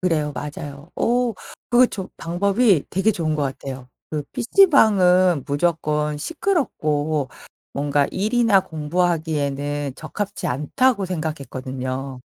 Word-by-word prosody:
그래요. 155 -5 0
맞아요. 145 +1 -7
어. 245 0 +1 0.4
그게 245 +1 +6
저 190 -3 -5
방법이 195 - +2
되게 195 +4 +2
좋은 160 -6 -1
것 150 - -1
같아요. 135 -1 -5 0.2
그 150 -1 -2
PC방은 190 - +4
무조건 150 -1 0
시끄럽고 155 - -1 0.4
뭔가 145 0 +1
'일이나 215 0 +3
공부하기에는 150 -4 -1
적합지 205 -1 -5
않다.'고 195 - +1
생각했거든요. 135 -5 -4
160 Hz, 270 characters per minute, -22 LUFS, 145-200 Hz, 0.4 s, 그게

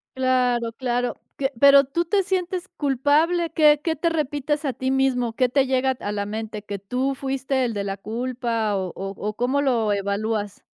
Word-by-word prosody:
Claro, 250 -3 +1
claro, 245 0 -1 0.2
qué 270 0 -1
¿pero 280 0 +8
tú 315 +6 -1
te 390 +3 +1
sientes 365 -1 -2
culpable?, 300 +5 +2
¿qué 300 -2 +5
qué 325 -1 0
te 335 +3 0
repites 295 -1 -1
a 265 - 0
ti 260 +2 -2
mismo?, 255 -3 +1
¿qué 255 +1 +2
te 275 +1 +2
llega 260 0 +1
t - - -17
a 205 - -2
la 205 -1 -2
mente?, 215 0 -5
¿que 205 -1 -5
tú 255 +7 -2
fuiste 265 0 -1
el 235 -2 -1
de 200 -1 -2
la 195 0 -2
culpa 230 0 -2
o 190 -1 -1
o 195 +1 -5
o 210 +1 -4
cómo 260 +5 +1
lo 230 -6 +1
evalúas? 205 +1 -2
255 Hz, 195 wpm, -23 LUFS, 225-285 Hz, 0.2 s, pero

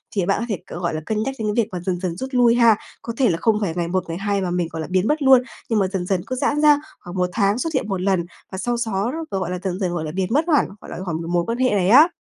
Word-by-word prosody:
thì 195 -3 +1
bạn 195 - +1
có 235 - -2
thể 200 - -1 0.2
c 175 - -6
gọi 170 - -1
là, 155 - -3
cân 215 0 -1
nhắc 270 0 -3
đến 210 -1 -1
cái 235 - +3
việc 220 - -10
mà 180 - -4
dần 180 -2 -1
dần 180 -3 -3
rút 260 +4 -4
lui 240 -1 +5
ha. 235 -2 +6 0.3
Có 230 - -5
thể 260 -4 +3
là 165 - +1
không 220 -2 +3
phải 175 -5 -1
ngày 175 -1 -1
một 185 +1 0
ngày 165 - -3
hai 200 0 -1
mà 180 -2 -2
mình, 175 -1 0
gọi 160 0 -4
là, - - -5
biến 185 +3 +1
mất 300 0 +1
luôn, 265 -2 +7 0.3
nhưng 225 - +2
mà 195 - +2
dần 185 -2 -3
dần 185 -2 0
cứ 255 - -2
giãn 290 +3 0
ra 295 -1 +6 0.2
khoảng 175 +1 -9
1 180 0 +1
tháng 205 0 +2
xuất 325 +4 -2
hiện 260 - 0
1 195 -3 -2
lần, 185 -3 +1 0.3
và 190 - -5
sau 240 +5 -1
xó 220 0 -1 0.2
gọi 185 -3 -2
là, 180 - -3
dần 185 -1 -2
dần, 180 -3 -1
gọi 170 - -2
là, 155 - -4
biến 185 +1 -1
mất 300 +5 +2
hẳn, - - +3
gọi - - -11
là, - - -6
khỏi 170 - -2
cái 165 - -6
mối 175 -1 +2
quan 230 +1 -1
hệ 255 0 +2
này 190 -3 +2
á. 290 +9 +8
195 Hz, 340 wpm, -22 LUFS, 180-235 Hz, 0.3 s, á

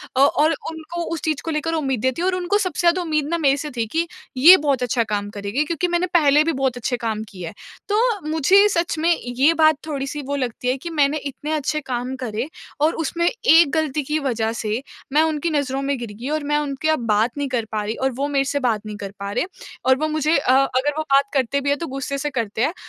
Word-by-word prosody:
अ, - - +1
और 295 +3 +4 0.2
उनको 325 +2 -6
उस 330 - -4
चीज़ 310 -3 -1
को 325 - -2
लेकर 320 +2 -1
उम्मीदें 265 -5 0
थी - - -3
और 370 +1 +1
उनको 365 +3 +1
सबसे 370 -6 -2
ज़्यादा 360 +2 +3
उम्मीद 305 -4 -1
ना, 340 - 0
मेरे 280 -3 +3
से 300 +1 -4
थी 230 - +1
कि, 330 +7 -1 0.3
"ये 345 +8 +9
बहुत 280 -5 0
अच्छा 240 -1 +1
काम 205 -2 -3
करेगी।" 205 +7 -2
क्योंकि 335 +3 -1
मैंने 345 +1 0
पहले 300 -3 +5
भी 330 - 0
बहुत 265 -3 -1
अच्छे 245 +1 -2
काम 220 -2 -3
किए 180 -3 -8
हैं। 165 - -8 0.4
तो 415 +2 +2 0.3
मुझे 375 +7 +5
सच 340 -4 -1
में 330 - +2 0.2
ये 260 +6 +3
बात 315 -1 +4
थोड़ी-सी 285 0 -3
वो 285 - -1
लगती 250 -2 -3
है 255 - +1
कि 340 +6 -7
मैंने 300 -2 +2
इतने 290 +1 -6
अच्छे 305 0 -1
काम 255 0 -3
करे 225 +3 -3 0.3
और 315 +2 +3
उसमें 340 +2 -1
एक 340 - +5
गलती 305 -2 0
की 300 +3 -1
वज़ह 230 -6 -1
से 220 +3 -2 0.3
मैं 300 - +5
उनकी 320 +1 -1
नज़रों 275 -3 -1
में 280 0 -1
गिर 230 -3 -6
गई 255 +4 -4
और 305 -1 -1
मैं 295 +1 +1
उनकी 295 0 -2
अब 280 -7 +1
बात 220 +5 +1
नहीं 285 - -1
कर 240 -3 -1
पा 215 -1 -1
रही 215 +2 -3
और 265 0 0
वो 280 - 0
मेरे 275 -1 +1
से 285 +1 -1
बात 225 -5 0
नहीं 210 -1 -6
कर 200 -1 -6
पा 200 0 -4
रहे 210 - 0 0.4
और 260 - +5
वो 310 +3 -1
मुझे 310 0 +1
अ, 265 - +1
अगर 275 +1 +1
वो - - +1
बात 275 -2 +3
करते 270 0 +1
भी 280 - -1
हैं, 285 - +2
तो 335 - -4
गुस्से 275 +1 -4
से 295 +2 -2
करते 225 -4 -3
हैं। 300 +7 +1
285 Hz, 250 wpm, -21 LUFS, 250-315 Hz, 0.4 s, ये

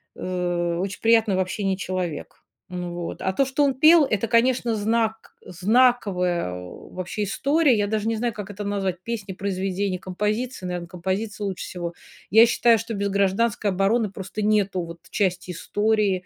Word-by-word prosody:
э, 175 -2 -2
очень 190 +1 -3
приятный 225 -3 +4
в - - 0
общении 190 +1 -1
человек. 185 -4 -4 0.3
Ну 180 -1 -5
вот, 175 -1 -5
а 190 - 0
то, 275 - +2
что 270 +2 +1
он 275 -2 +2
пел, 310 +4 +7
это, 220 -3 -1
конечно, 235 0 +2
знак 220 +1 -1
знаковая 185 - +2
вообще 175 - -6
история. 280 +5 +2
Я 205 0 +1
даже 215 +1 -1
не 225 - 0
знаю, 235 0 -1
как 205 -1 -7
это 205 +1 -6
назвать: 195 -3 -1
песни, 215 -4 -4
произведения, 190 0 -2
композиции. 210 +4 -3
Наверно, 175 -1 -4
композиции 190 +5 -3
лучше 190 -2 -4
всего. 175 -1 -5 0.4
Я 220 +3 +8
считаю, 235 0 +4
что 225 +2 -5
без 200 -1 -1
"Гражданской 200 +2 +1
обороны" 200 +4 +1
просто 195 +2 -6
нету 205 -3 +1
вот 170 0 -9
части 180 -2 -1
истории 205 +1 0
200 Hz, 160 wpm, -24 LUFS, 185-225 Hz, 0.4 s, Я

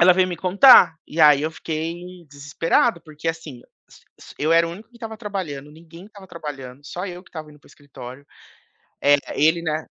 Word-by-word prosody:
ela 180 +1 +7
veio 185 0 +2
me 175 - -5
contar, 190 -2 +6
e 160 - -4
aí 150 -2 +6
eu 155 - -1
fiquei 170 +3 -6
desesperado. 165 +8 0
Porque 155 0 -7
assim, 160 -6 -6 0.3
s - - -20 0.2
s - - -15
eu 155 +3 +1
era 165 0 +4
o 165 - -6
único 210 +5 -12
que 240 - -19
estava 225 -2 -8
trabalhando. 185 -10 -6
Ninguém 165 +2 -15
estava 205 -2 -15
trabalhando. 145 -7 -9
Só 180 +5 -6
eu 180 -1 -8
que - - -22
estava 155 -2 -9
indo 150 - -18
para - - -24
o - - -20
escritório. 140 -1 -12 0.8
El 145 0 +4 0.2
ele, 160 +4 +2
né 155 -1 -3
165 Hz, 205 wpm, -21 LUFS, 150-180 Hz, 0.8 s, ela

